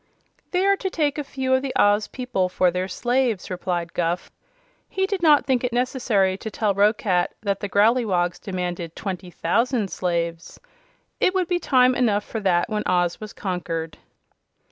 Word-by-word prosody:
"They 365 Hz, +1 st, +1 dB
are 395 Hz, 0 st, +4 dB
to 385 Hz, -, -3 dB
take 300 Hz, -4 st, 0 dB
a -, -, -2 dB
few 265 Hz, -1 st, -2 dB
of 260 Hz, -, +3 dB
the 270 Hz, -1 st, -4 dB
Oz 205 Hz, +1 st, +3 dB
people 250 Hz, -8 st, -2 dB
for 180 Hz, 0 st, +2 dB
their 180 Hz, +1 st, -2 dB
slaves," 240 Hz, 0 st, -1 dB
replied 175 Hz, -2 st, -3 dB
Guph. 175 Hz, +1 st, -2 dB, 0.6 s
He 385 Hz, -, 0 dB
did 390 Hz, -2 st, -3 dB
not 300 Hz, -3 st, +5 dB
think 260 Hz, -2 st, +1 dB
it 250 Hz, -, -1 dB
necessary 230 Hz, -6 st, +1 dB
to 220 Hz, -, -5 dB
tell 210 Hz, -1 st, 0 dB
Roquat 200 Hz, -3 st, +1 dB
that 200 Hz, -2 st, -1 dB
the 205 Hz, -, -4 dB
Growleywogs 200 Hz, -5 st, +2 dB
demanded 180 Hz, -4 st, -4 dB
twenty 185 Hz, -2 st, -5 dB
thousand 220 Hz, +5 st, 0 dB
slaves. 170 Hz, -2 st, -3 dB, 0.6 s
It 370 Hz, -, +2 dB
would 370 Hz, -2 st, +1 dB
be 355 Hz, 0 st, 0 dB
time 255 Hz, -5 st, +4 dB
enough 215 Hz, -5 st, +1 dB
for 225 Hz, -, -5 dB
that 180 Hz, -4 st, +2 dB
when 215 Hz, -2 st, -2 dB
Oz 175 Hz, 0 st, +1 dB
was 215 Hz, -1 st, -7 dB
conquered. 165 Hz, -4 st, -4 dB
205 Hz, 170 wpm, -23 LUFS, 180-255 Hz, 0.6 s, not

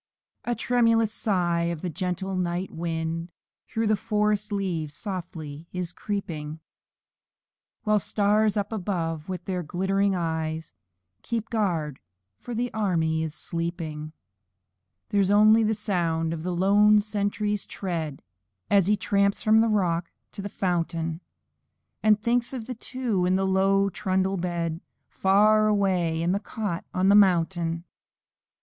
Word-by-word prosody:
A 240 Hz, -, 0 dB
tremulous 230 Hz, -3 st, +2 dB
sigh, 175 Hz, -6 st, 0 dB
as 170 Hz, -2 st, -4 dB
a -, -, -1 dB
gentle 185 Hz, +3 st, -3 dB
night 180 Hz, +1 st, -2 dB
wind 165 Hz, 0 st, -3 dB, 0.4 s
Through 225 Hz, 0 st, -1 dB
the 215 Hz, 0 st, +3 dB
forest 210 Hz, 0 st, 0 dB
leaves 170 Hz, -7 st, -2 dB
slowly 165 Hz, -6 st, -6 dB
is 180 Hz, -2 st, -3 dB
creeping; 160 Hz, -8 st, -4 dB, 1.2 s
While 215 Hz, -1 st, +3 dB
the 205 Hz, -, -2 dB
stars 210 Hz, 0 st, +2 dB
up 205 Hz, +1 st, -1 dB
above, 170 Hz, -6 st, -3 dB
with 180 Hz, -2 st, -5 dB
their 185 Hz, -2 st, -2 dB
glittering 190 Hz, +4 st, 0 dB
eyes, 160 Hz, -2 st, -3 dB, 0.5 s
Keep 230 Hz, -, -3 dB
guard 170 Hz, -, -1 dB, 0.5 s
o'er 240 Hz, -, -3 dB
the 245 Hz, +2 st, -2 dB
army 165 Hz, -7 st, +1 dB
while 160 Hz, 0 st, -1 dB
sleeping. 160 Hz, -1 st, -4 dB, 1.0 s
There's 200 Hz, -2 st, +2 dB
only 215 Hz, +2 st, +6 dB
the 220 Hz, 0 st, +2 dB
sound 170 Hz, -6 st, 0 dB
of 160 Hz, -, -5 dB
the 180 Hz, +1 st, -2 dB
lone 205 Hz, +3 st, +5 dB
sentry's 205 Hz, 0 st, -1 dB
tread, 165 Hz, -7 st, -4 dB, 0.5 s
As 195 Hz, -3 st, +5 dB
he 210 Hz, 0 st, +3 dB
tramps 200 Hz, 0 st, +1 dB
from 220 Hz, 0 st, +5 dB
the 225 Hz, -, +4 dB
rock 175 Hz, -5 st, +1 dB, 0.2 s
to -, -, -7 dB
the 200 Hz, -, -5 dB
fountain, 165 Hz, -3 st, -2 dB, 0.8 s
And 215 Hz, -1 st, +4 dB
thinks 235 Hz, +3 st, 0 dB
of 245 Hz, -4 st, -5 dB
the 250 Hz, -, -4 dB
two 230 Hz, -6 st, -1 dB
on 185 Hz, -, +3 dB
the 195 Hz, 0 st, +1 dB
low 195 Hz, +1 st, +3 dB
trundle 190 Hz, 0 st, 0 dB
bed, 170 Hz, -2 st, -2 dB, 0.3 s
Far 215 Hz, +3 st, +4 dB
away, 185 Hz, -6 st, +1 dB
in 175 Hz, -, +1 dB
the 195 Hz, -, +1 dB
cot 205 Hz, -5 st, -4 dB
on 185 Hz, +1 st, +2 dB
the -, -, +6 dB
mountain. 170 Hz, -4 st, +3 dB
190 Hz, 140 wpm, -26 LUFS, 170-210 Hz, 1.2 s, only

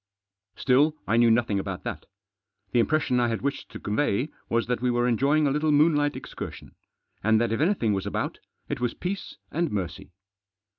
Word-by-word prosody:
Still, 145 Hz, +4 st, +3 dB
I 110 Hz, -, +1 dB
knew 120 Hz, 0 st, +6 dB
nothing 115 Hz, -3 st, +2 dB
about 95 Hz, -2 st, -5 dB
that. -, -, -5 dB, 0.6 s
The 120 Hz, -, +3 dB
impression 125 Hz, 0 st, +2 dB
I 120 Hz, -, +3 dB
had 115 Hz, +1 st, -2 dB
wished 140 Hz, 0 st, -2 dB
to -, -, -8 dB
convey 120 Hz, +4 st, 0 dB, 0.2 s
was 115 Hz, 0 st, +1 dB
that 125 Hz, 0 st, -1 dB
we 125 Hz, -, +1 dB
were 120 Hz, 0 st, +2 dB
enjoying 140 Hz, +6 st, +3 dB
a 140 Hz, -, +2 dB
little 150 Hz, +2 st, +1 dB
moonlight 145 Hz, -1 st, +3 dB
excursion, -, -, -8 dB, 0.5 s
and 110 Hz, +1 st, +4 dB
that 115 Hz, -1 st, +1 dB
if 115 Hz, -, 0 dB
anything 155 Hz, -, +2 dB
was 95 Hz, -1 st, -2 dB
about, -, -, -3 dB, 0.3 s
it -, -, -3 dB
was 120 Hz, -1 st, -1 dB
peace 190 Hz, +2 st, -5 dB
and 170 Hz, +2 st, 0 dB
mercy. 95 Hz, -1 st, -4 dB
125 Hz, 185 wpm, -26 LUFS, 115-145 Hz, 0.6 s, knew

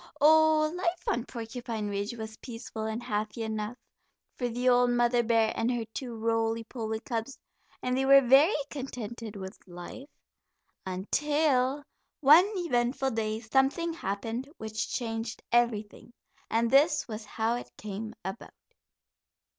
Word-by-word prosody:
Oh, 310 Hz, +1 st, +5 dB
life 355 Hz, -1 st, -1 dB
on 240 Hz, +1 st, 0 dB
Porcupine 230 Hz, -2 st, -5 dB
Ridge 205 Hz, +3 st, -3 dB
was 220 Hz, -1 st, -6 dB
peaceful 230 Hz, -2 st, -7 dB
and 220 Hz, +2 st, -4 dB
happy 215 Hz, +1 st, -2 dB
enough 220 Hz, +1 st, -3 dB, 0.6 s
for 245 Hz, -1 st, -2 dB
the 245 Hz, +2 st, -2 dB
old 245 Hz, 0 st, +5 dB
mother 240 Hz, 0 st, +3 dB
bear 225 Hz, -1 st, +2 dB
and 225 Hz, +1 st, 0 dB
her 240 Hz, -2 st, -2 dB
two 245 Hz, -4 st, -5 dB
roly 225 Hz, 0 st, 0 dB
poly 220 Hz, -2 st, -4 dB
cubs, 235 Hz, +2 st, -4 dB, 0.5 s
and 250 Hz, 0 st, 0 dB
they 265 Hz, -, +1 dB
were 275 Hz, 0 st, +9 dB
very 280 Hz, -, +6 dB, 0.2 s
contented 235 Hz, -5 st, -6 dB
with 190 Hz, 0 st, -8 dB
life 175 Hz, +10 st, -9 dB, 0.8 s
until 275 Hz, +7 st, +1 dB, 0.4 s
one 310 Hz, +8 st, +7 dB
eventful 265 Hz, -6 st, 0 dB
day 220 Hz, -1 st, -2 dB
something 270 Hz, +8 st, +1 dB
happened 225 Hz, -, -4 dB
which 220 Hz, 0 st, -4 dB
changed 225 Hz, -2 st, -3 dB
everything, 235 Hz, -1 st, 0 dB, 0.4 s
and 230 Hz, +1 st, +1 dB
this 295 Hz, +3 st, +4 dB
was 220 Hz, -1 st, -6 dB
how 220 Hz, +2 st, -1 dB
it 240 Hz, -, -5 dB
came 215 Hz, +2 st, -6 dB
about. 190 Hz, +4 st, -7 dB
235 Hz, 135 wpm, -29 LUFS, 220-265 Hz, 0.8 s, were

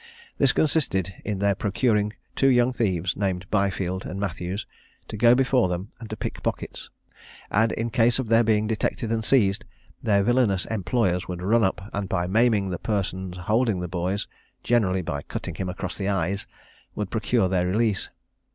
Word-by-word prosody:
This 135 Hz, -2 st, +5 dB
consisted 100 Hz, -, +1 dB
in 105 Hz, -2 st, -2 dB
their 100 Hz, +1 st, +2 dB
procuring 105 Hz, +1 st, +1 dB, 0.2 s
two 135 Hz, -, +3 dB
young 125 Hz, -1 st, +4 dB
thieves, 95 Hz, -6 st, 0 dB
named 95 Hz, -2 st, -1 dB
Byfield 95 Hz, -2 st, 0 dB
and 95 Hz, -, -5 dB
Mathews, 95 Hz, +1 st, -3 dB, 0.4 s
to -, -, -5 dB
go 120 Hz, +3 st, +5 dB
before 130 Hz, -6 st, +3 dB
them 90 Hz, +4 st, -3 dB
and 115 Hz, -2 st, -9 dB
to 110 Hz, -, -5 dB
pick -, -, -5 dB
pockets; -, -, -4 dB, 0.6 s
and 110 Hz, +2 st, +3 dB
in 115 Hz, +1 st, -2 dB
case 120 Hz, +1 st, +3 dB
of 130 Hz, -3 st, -2 dB
their 115 Hz, +1 st, +5 dB
being 110 Hz, -1 st, +2 dB
detected 110 Hz, +1 st, -1 dB
and 115 Hz, -1 st, 0 dB
seized, 110 Hz, -3 st, +3 dB, 0.4 s
their 100 Hz, -4 st, +3 dB
villanous 115 Hz, -5 st, +2 dB
employers 95 Hz, -3 st, 0 dB
would 90 Hz, -1 st, -5 dB
run 110 Hz, +4 st, +3 dB
up, 95 Hz, +1 st, -1 dB
and 100 Hz, -1 st, -3 dB
by 85 Hz, -2 st, 0 dB
maiming 105 Hz, 0 st, +2 dB
the 90 Hz, -, -3 dB
person 95 Hz, -3 st, -2 dB
holding 105 Hz, +3 st, +1 dB
the 90 Hz, -, -3 dB
boys, 90 Hz, +3 st, -2 dB, 0.4 s
generally 95 Hz, -6 st, +2 dB
by 80 Hz, -4 st, -3 dB
cutting -, -, -5 dB
him 95 Hz, -1 st, -4 dB
across 90 Hz, -, -4 dB
the 100 Hz, -, -3 dB
eyes, 95 Hz, 0 st, -1 dB, 0.5 s
would 105 Hz, -3 st, -3 dB
procure 110 Hz, -1 st, +1 dB
their 90 Hz, -1 st, +1 dB
release. 105 Hz, +1 st, +1 dB
100 Hz, 175 wpm, -25 LUFS, 95-115 Hz, 0.6 s, This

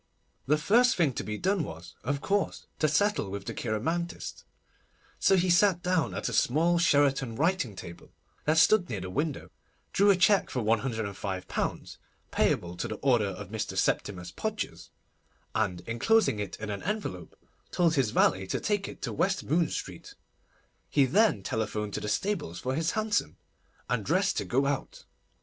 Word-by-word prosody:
The 150 Hz, +2 st, +4 dB
first 240 Hz, +10 st, +4 dB
thing 155 Hz, -7 st, +2 dB
to -, -, -4 dB
be 105 Hz, 0 st, -4 dB
done 190 Hz, -, +1 dB
was, 85 Hz, -, -9 dB
of 140 Hz, +3 st, -2 dB
course, 200 Hz, 0 st, -1 dB
to 155 Hz, -, +3 dB
settle 160 Hz, -, +1 dB
with 100 Hz, 0 st, -6 dB
the -, -, -4 dB
cheiromantist; 165 Hz, +11 st, -3 dB, 0.7 s
so 195 Hz, -, +4 dB
he 180 Hz, -1 st, +2 dB
sat 180 Hz, 0 st, +4 dB
down 180 Hz, -6 st, +1 dB
at -, -, -2 dB
a -, -, -3 dB
small 170 Hz, +6 st, +3 dB
Sheraton 140 Hz, -7 st, +2 dB
writing 155 Hz, -, 0 dB
table 85 Hz, -2 st, -10 dB, 0.3 s
that 155 Hz, +1 st, +2 dB
stood 180 Hz, +3 st, +5 dB
near 105 Hz, -5 st, -3 dB
the 95 Hz, 0 st, -6 dB
window, 145 Hz, -, -2 dB, 0.4 s
drew 200 Hz, +1 st, +4 dB
a 200 Hz, -, +7 dB
cheque 190 Hz, +2 st, +3 dB
for 125 Hz, -, -2 dB
£105, 105 Hz, -5 st, -2 dB, 0.5 s
payable 85 Hz, 0 st, +1 dB
to -, -, -2 dB
the 110 Hz, -, -4 dB
order 120 Hz, -6 st, +3 dB
of 95 Hz, 0 st, -7 dB
Mr. 110 Hz, 0 st, -4 dB
Septimus 90 Hz, -3 st, -1 dB
Podgers, -, -, -4 dB, 0.6 s
and, 95 Hz, -5 st, -1 dB
enclosing 120 Hz, -, +2 dB
it 100 Hz, -3 st, -4 dB
in 110 Hz, -1 st, -4 dB
an 100 Hz, -, -4 dB
envelope, 190 Hz, -, -4 dB, 0.3 s
told 170 Hz, -2 st, +2 dB
his 135 Hz, -7 st, +2 dB
valet 95 Hz, -2 st, +2 dB
to -, -, -1 dB
take 205 Hz, -2 st, -1 dB
it -, -, -10 dB
to -, -, -2 dB
West 195 Hz, +1 st, 0 dB
Moon 160 Hz, +2 st, +1 dB
Street. -, -, -6 dB, 0.7 s
He 140 Hz, -2 st, +4 dB
then 190 Hz, -, +3 dB
telephoned 105 Hz, -1 st, -2 dB
to -, -, -2 dB
the 105 Hz, -, -3 dB
stables 130 Hz, -, -2 dB
for 130 Hz, +1 st, -2 dB
his 160 Hz, +4 st, 0 dB
hansom, 215 Hz, -1 st, -1 dB, 0.5 s
and 115 Hz, -2 st, -1 dB
dressed 190 Hz, -, +1 dB
to -, -, -1 dB
go 135 Hz, +3 st, +1 dB
out. 140 Hz, -1 st, -3 dB
140 Hz, 170 wpm, -29 LUFS, -, 0.7 s, a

